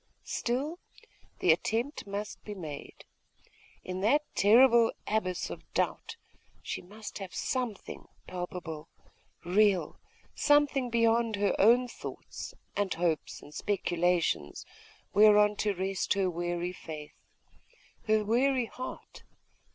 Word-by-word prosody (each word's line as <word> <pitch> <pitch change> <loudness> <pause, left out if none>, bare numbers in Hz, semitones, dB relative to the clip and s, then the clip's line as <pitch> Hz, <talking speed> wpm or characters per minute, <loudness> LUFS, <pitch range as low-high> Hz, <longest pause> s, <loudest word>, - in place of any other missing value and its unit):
Still, 280 +8 -2 0.6
the 175 - +6
attempt 225 - -1
must 205 +1 -5
be 210 - -7
made. 155 -6 -8 0.8
In 185 0 -4
that 285 +9 +3
terrible 235 +2 +6
abyss 185 -4 -1
of - - -10
doubt, - - -1 0.5
she - - -4
must 210 +4 -9
have 190 -2 -7
something 245 -6 -3 0.2
palpable, 175 -3 -6 0.6
real; 195 +1 +2 0.3
something 290 -3 +3
beyond 230 -1 +2
her 200 -1 +1
own 240 +5 +5
thoughts, - - -8 0.2
and 205 -2 0
hopes, 165 -2 -1
and 145 - -13
speculations, 175 - 0 0.5
whereon 210 0 +6
to 205 -2 0
rest 190 +1 -1
her 190 -2 +1
weary 175 +1 -2
faith, 155 -4 -8 0.9
her 215 -1 +3
weary 250 +3 +2
heart.... 255 +3 -8
205 Hz, 110 wpm, -30 LUFS, 180-235 Hz, 0.9 s, the